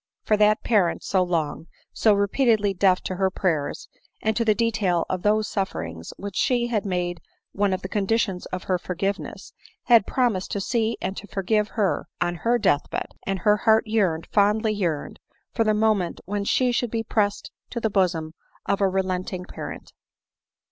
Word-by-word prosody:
For 215 - +3
that 210 0 +3
parent, 200 -7 +2
so 190 - +1
long, 170 -3 -1 0.3
so 215 -2 +4
repeatedly 205 0 +2
deaf 185 -1 +3
to 185 - -4
her 190 0 +2
prayers, 165 -6 -2 0.3
and 220 0 0
to 230 - +1
the 215 -2 +3
detail 210 -6 +1
of 185 -1 -2
those 210 +2 +2
sufferings 85 - -4
which 200 -1 -7
she 245 -2 +2
had 215 -4 -1
made 175 -2 -2 0.3
one 200 0 +1
of 185 0 -2
the - - -3
condi 210 +3 +1
tions 190 -5 -2
of 185 0 -5
her 185 -2 0
forgiveness, 195 +3 -4 0.3
had 235 -5 +5
promised 235 -8 0
to 200 - -1
see 225 +2 0
and 190 +1 -2
to 205 - -7
for 195 -2 -4
give 210 +1 +2
her 200 -4 +1
on 175 0 0
her 235 +7 +2
death 185 -10 +1
bed; - - -3 0.2
and 195 0 0
her 210 +2 +4
heart 220 0 +3
yearned, 195 -7 +1
fondly 215 +1 +3
yearned, 170 -8 -2 0.3
for 230 - +2
the 215 -1 +2
moment 210 -5 +1
when 205 +1 -2
she 250 +4 +2
should 240 0 0
be 225 0 -2
pressed 205 -2 -1 0.2
to 240 - -4
the 220 -2 -1
bosom 175 -5 0 0.3
of 200 - 0
a 195 - +4
relenting 185 -1 -2
parent. - - -8
200 Hz, 185 wpm, -24 LUFS, 185-220 Hz, 0.3 s, had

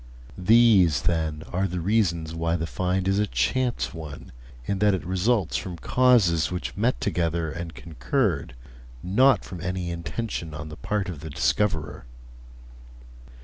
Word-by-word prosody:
These, 95 - +5
then, 80 -2 -1
are 95 +2 +1
the 90 0 -4
reasons 85 -4 0
why 85 0 -1
the 80 -1 -2
find 95 +2 -1
is 95 +1 +2
a 105 - +1
chance 120 - 0
one, 80 -3 -9 0.3
in 100 +5 -2
that 105 -1 +4
it 90 - -6
results 95 +1 +1
from 90 -2 -6
causes 100 -9 +3
which 90 -1 -4
met 115 +6 0
together 85 -3 -1
and 85 +1 -6
concurred, 85 - -2 0.5
not 130 +9 +3
from 90 -3 -8
any 90 -1 -3
intention 85 0 -4
on 75 +1 -7
the 75 - -8
part 105 +2 -2
of 85 -5 -6
the 80 - -7
discoverer. 80 -4 -1
90 Hz, 145 wpm, -25 LUFS, 80-105 Hz, 0.5 s, These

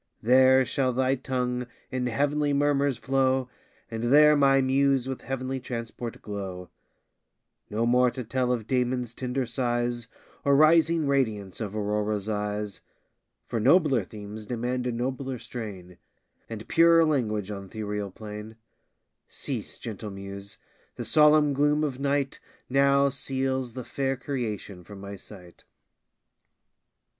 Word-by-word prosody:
There 130 +2 +6
shall 130 +1 0
thy 130 +1 +2
tongue 125 -2 -2 0.2
in 130 -1 -1
heav'nly 145 +4 +1
murmurs 140 -2 +2
flow, 130 -1 +1 0.4
And 115 +1 -3
there 150 +4 +7
my 135 -1 +5
muse 135 0 +2
with 130 -1 -4
heav'nly 130 +1 -3
transport 115 -1 -6
glow: 95 -3 -6 1.0
No 110 +3 0
more 125 +1 +4
to 125 +1 -6
tell 125 +2 0
of 115 -4 -1
Damon's 125 -1 -1
tender 125 +1 -2
sighs, 120 -1 -1 0.4
Or 140 0 +4
rising 160 +1 +5
radiance 110 -9 -1
of 105 -1 -4
Aurora's 105 0 -1
eyes, 105 -1 -3 0.6
For 115 - -2
nobler 135 - +4
themes 105 +1 -9
demand 125 +1 -2
a - - 0
nobler 130 +2 -3
strain, 100 -8 -8 0.5
And 110 -1 -7
purer 165 0 +5
language 110 -9 0
on 100 -1 -6
th' - - -18
ethereal 105 -2 -3
plain. 105 +2 -9 0.7
Cease, - - -5
gentle 110 -1 -6
muse! 100 0 -8 0.4
the - - -5
solemn 150 -1 +5
gloom 150 +2 +2
of 135 -4 -2
night 140 -1 0 0.3
Now 140 +1 +4
seals 130 -2 -2
the 130 - -6
fair 135 +2 -2
creation 110 -8 -4
from 100 +2 -11
my 100 +1 -7
sight. 90 -3 -14
125 Hz, 130 wpm, -27 LUFS, 105-135 Hz, 1.0 s, there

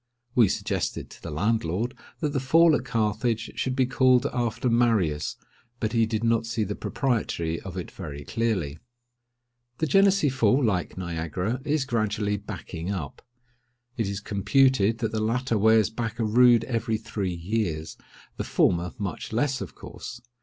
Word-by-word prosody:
We 120 -4 +5
suggested - - -2
to - - -14
the - - -6
landlord 105 +5 0 0.3
that 150 - +1
the 135 - +1
fall 160 +5 +5
at - - -1
Carthage 115 -1 0
should 130 -1 -1
be 130 -1 +3
called 130 0 +3
after 120 0 -1
Marius, 110 -11 +2 0.4
but 110 0 -1
he 115 -1 +3
did 110 0 -2
not 115 0 +2
see 115 -1 -1
the 105 0 -3
propriety 105 - -1
of 95 -1 -7
it 90 - -5
very 75 -6 -7
clearly. 90 -6 -1 1.0
The 160 - 0
Genessee 195 0 +4
Fall, 135 +1 +2
like 90 -5 -1
Niagara, 90 - -3
is 150 -2 +1
gradually 105 -3 0
backing 95 -4 -6
up. 90 -8 -4 0.7
It 115 -4 -1
is 100 0 -4
computed 110 +2 +3
that 115 -1 -2
the 110 - -1
latter 115 +2 0
wears 110 +1 +4
back 115 0 -4
a 115 - 0
rood 120 +1 +5
every 115 -2 -1
three 105 -5 -3
years—the 85 -3 -4
former 85 0 +1
much 100 -3 -5
less, 130 +3 0
of - - -7
course. 120 - -9
110 Hz, 155 wpm, -26 LUFS, 95-125 Hz, 1.0 s, We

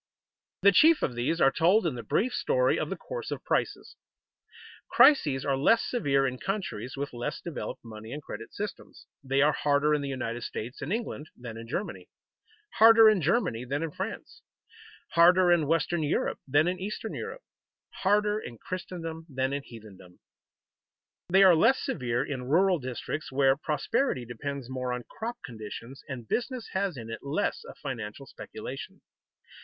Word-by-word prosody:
_ - - -65 0.6
The 200 - +8
chief 315 - +5
of 125 - 0
these 125 +8 -1
are 135 - +5
told 180 +8 +3
in 160 - +1
the 120 - -5
brief 245 - 0
story - - +2
of - - -2
the - - -3
course 485 -3 -6
of - - -5
prices. - - -2 0.9
Crises 145 - +5
are 140 - +2
less 225 +12 +4
severe 140 - +1
in 130 -1 -2
countries 160 - -4
with 140 -1 -4
less 120 +5 -4
developed 165 -7 -6
money 110 0 -9
and 145 - -4
credit 115 - -8
systems. 205 -1 -7 0.2
They 135 +1 +2
are 150 - +5
harder 150 0 +2
in 150 - +1
the 140 - -4
United 120 -3 -3
States 115 +1 -6
and 145 - -4
England 215 -9 -3
than 120 -2 -8
in 115 0 -9
Germany, 185 - -5 0.7
harder 225 0 +9
in 200 -4 +1
Germany 160 - +1
than 140 +5 -2
in 165 - -3
France, - - -6 0.7
harder 175 +2 +6
in 165 -4 +3
western 165 +1 +1
Europe 150 - 0
than 145 +4 +3
in 180 0 -1
eastern 210 +3 -5
Europe, - - -6 0.6
harder 210 +2 +2
in 120 - -9
Christendom 165 0 -6
than 130 0 -1
in 140 - -2
heathendom. 105 -8 -14 1.1
They 190 +2 +6
are 185 -2 +8
less 230 +11 +4
severe 120 -1 -1
in 130 -3 -5
rural 180 +3 +4
districts, 130 +3 -5
where 135 0 +4
prosperity 150 - -1
depends 130 +3 -5
more 130 -1 -3
on 125 0 -4
crop 235 +2 -6
conditions, 115 +3 -8
and 120 -4 -6
business 245 - -2
has 190 -5 -1
in 115 -1 -7
it 115 - -5
less 140 +2 -2
of - - -11
financial 125 -2 -6
speculation. - - -8
145 Hz, 170 wpm, -28 LUFS, 125-190 Hz, 1.1 s, harder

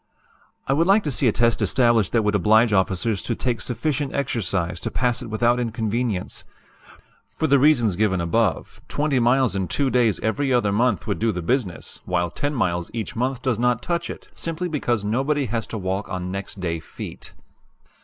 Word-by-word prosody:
"I 135 - +2
would 165 +5 +2
like 200 +2 +5
to 145 - -1
see 130 +1 +2
a - - +5
test 115 +1 +2
established 115 -1 +3
that 115 -2 +3
would 105 0 +1
oblige 110 +3 +4
officers 95 +2 +1
to 115 - -2
take 125 -1 -2
sufficient 135 +3 -2
exercise 100 -10 -1
to - - -3
pass 125 -1 0
it - - -6
without 120 +3 +2
inconvenience. 115 -3 -2 0.8
For - - -3
the 140 -2 +4
reasons 120 - +4
given 95 -2 +1
above, 95 +3 -1
20 145 -3 0
miles 125 -1 +3
in 95 -2 -1
two 140 -2 0
days 120 -4 +2
every 135 +5 0
other 120 -5 +2
month 110 -2 +1
would - - -2
do 115 0 +2
the 90 -3 -4
business, 110 - -2
while 85 -1 0
10 145 +8 -2
miles 90 -7 -1
each 110 -2 -4
month 125 +2 -2
does 120 -5 0
not 125 -1 +1
touch 170 -1 -2
it, - - -8
simply 165 +2 -4
because 120 - -1
nobody 135 +6 0
has 115 0 -3
to 115 - -5
walk 95 0 -3
on 90 0 -4
'next 100 +1 -6
day' 85 -2 -2
feet. - - -9
115 Hz, 190 wpm, -23 LUFS, 100-130 Hz, 0.8 s, like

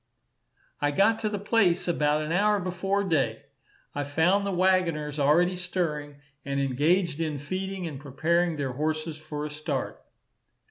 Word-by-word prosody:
I 145 - +2
got 200 +9 +3
to 215 - -1
the 210 - -2
place 200 -4 +2
about 150 -2 +1
an 155 - -4
hour 205 +4 +3
before 195 +2 -1
day. 135 - 0 0.5
I 145 - -2
found 175 +8 +2
the - - -1
waggoners 175 -5 +1
already 170 +6 +3
stirring, 165 -5 -3 0.3
and 140 0 -2
engaged 150 +5 +1
in 155 -3 -1
feeding 185 +5 -4
and 150 -5 -6
preparing 165 +5 0
their 140 -3 -2
horses 155 +3 -2
for 150 -1 -5
a 150 - -5
start. 150 -2 -4
160 Hz, 150 wpm, -27 LUFS, 145-185 Hz, 0.5 s, got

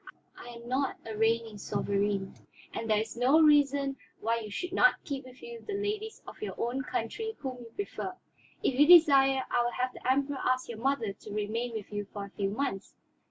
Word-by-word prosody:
I - - -11
am 235 0 -10
not 265 +2 0
a 220 -1 -5
reigning 225 -1 +1
sovereign, 200 -1 -1 0.4
there 220 -2 0
is 220 +2 -2
no 255 +6 +4
reason 285 -3 +4 0.2
why 230 +2 0
you 215 -2 -7
should 355 - -4
not 375 - +5
keep 275 -2 -5
with 255 0 -14
you 470 0 -8
the 415 - -4
ladies 420 +2 -3
of - - -11
your 425 - -4
own 245 +3 -1
country 440 - -3
whom 260 -3 -5
you 230 -1 -11
prefer. 380 -2 -4 0.5
If 260 0 +1
you 295 - +7
desire, 275 -6 +7
I 240 - +3
will 240 0 -1
have 255 0 -1
the 255 - -1
Emperor 275 +1 0
ask 255 0 +1
your 230 -2 -6
mother 250 -5 0
to 210 +1 -12
remain 220 +3 -2
with 215 -2 -6
you 205 0 -2
for 205 -1 -5
a 200 - -13
few 200 -1 -1
months." 205 -3 -3
250 Hz, 205 wpm, -30 LUFS, 220-280 Hz, 0.5 s, you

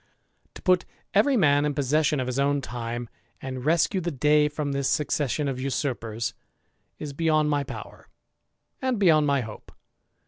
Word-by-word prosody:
put 185 -2 +4 0.3
every 255 +7 +4
man 145 -6 +4
in 150 -1 -1
possession 150 +1 +1
of 130 - -1
his 125 +1 -2
own 140 +1 +2
time, 120 -1 -5 0.3
and 130 -1 -6 0.3
e 190 - +1
the 175 -1 -2
day 150 +1 +3
from 150 -1 -3
this 140 -1 0
succession 150 -1 0
of 130 -2 -3
usurpers, 120 -5 -2 0.6
is 145 -2 -6
beyond 155 -1 +2 0.2
ower, - - -9 0.7
and 260 -2 0
beyond 160 -7 +4
my 140 -1 +2
hope. 110 -3 -9
145 Hz, 145 wpm, -26 LUFS, 130-155 Hz, 0.7 s, put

